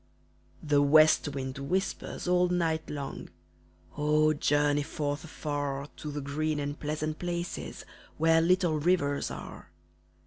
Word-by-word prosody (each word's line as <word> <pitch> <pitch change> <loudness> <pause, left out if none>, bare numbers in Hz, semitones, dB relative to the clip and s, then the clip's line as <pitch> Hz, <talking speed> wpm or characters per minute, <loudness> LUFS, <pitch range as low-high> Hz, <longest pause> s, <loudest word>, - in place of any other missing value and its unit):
The 145 -1 +3
west 155 +2 +5
wind 135 -2 -4
whispers 185 +6 -2
all 180 0 +4
night 165 -3 0
long 140 -2 -6 0.7
"Oh, 150 +1 +3
journey 145 0 +2
forth 145 0 -3
afar 145 -3 -4
To 150 - -6
the 145 0 -4
green 150 +2 -1
and 145 0 -4
pleasant 155 +1 -3
places 175 0 -4 0.3
Where 165 +1 +4
little 175 -2 +2
rivers 145 -3 +1
are!" - - -9
150 Hz, 125 wpm, -29 LUFS, 145-165 Hz, 0.7 s, west